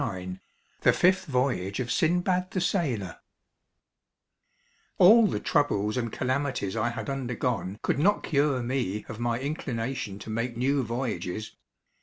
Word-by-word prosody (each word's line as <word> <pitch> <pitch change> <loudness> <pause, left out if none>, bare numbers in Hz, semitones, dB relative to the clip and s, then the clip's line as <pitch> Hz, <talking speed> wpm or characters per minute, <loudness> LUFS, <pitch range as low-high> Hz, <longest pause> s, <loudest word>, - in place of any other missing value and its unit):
Lowell 95 -6 -4 0.4
THE - - +5
FIFTH 185 +1 +3
VOYAGE 125 -8 0
OF 125 -1 -2
SINBAD 180 +2 +1
THE 185 - -2
SAILOR 140 - -1 1.8
All 215 +4 +8
the 105 - -1
troubles 105 -5 +1
and 120 -3 -2
calamities 130 -6 -1
I 115 +1 +1
had 120 - -5
undergone 125 -7 -2
could - - 0
not 200 +7 +3
cure 140 -4 +1
me 120 -5 -2
of 110 - -7
my 120 0 0
inclination 125 -6 -3
to 110 - -8
make 115 +2 -2
new 135 +3 +2
voyages. 110 -5 -3
125 Hz, 135 wpm, -27 LUFS, 110-145 Hz, 1.8 s, All